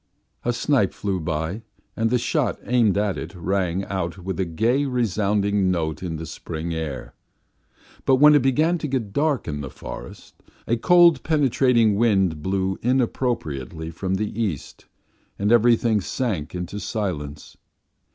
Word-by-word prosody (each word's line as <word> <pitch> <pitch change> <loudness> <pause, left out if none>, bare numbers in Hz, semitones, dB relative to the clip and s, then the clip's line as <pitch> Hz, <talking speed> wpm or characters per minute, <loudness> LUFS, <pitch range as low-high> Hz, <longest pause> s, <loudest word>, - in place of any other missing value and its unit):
A 120 - +1
snipe 120 -3 +1
flew 95 -2 -2
by, 80 +5 -3 0.3
and 115 0 +1
the 125 - +2
shot 125 +3 -1
aimed 115 -5 +2
at 105 -2 0
it - - -7
rang 95 +1 -1
out 95 -2 -3
with 95 +1 -5
a 95 - +1
gay, 115 - +1
resounding 105 -5 +1
note 80 -4 -1
in 90 -3 -4
the 80 +1 -6
spring 80 +2 -5
air. 70 -7 -5 0.9
But 135 - +5
when 150 +3 +7
it 145 - +5
began 155 +7 +2
to 155 - -3
get 125 -7 -3
dark 145 0 0
in 75 -2 -3
the 70 - -6
forest - - -10 0.3
a 115 - +1
cold, 175 +6 +5
penetrating 130 -7 +3
wind 95 -8 +2
blew 95 +1 -1
inappropriately 90 - -1
from 95 +3 -2
the 105 +3 -3
east, 95 - -4 0.5
and 100 +2 0
everything 115 -2 +4
sank 90 - -3
into 90 +3 -5
silence. 90 -9 -4
100 Hz, 150 wpm, -23 LUFS, 85-120 Hz, 0.9 s, when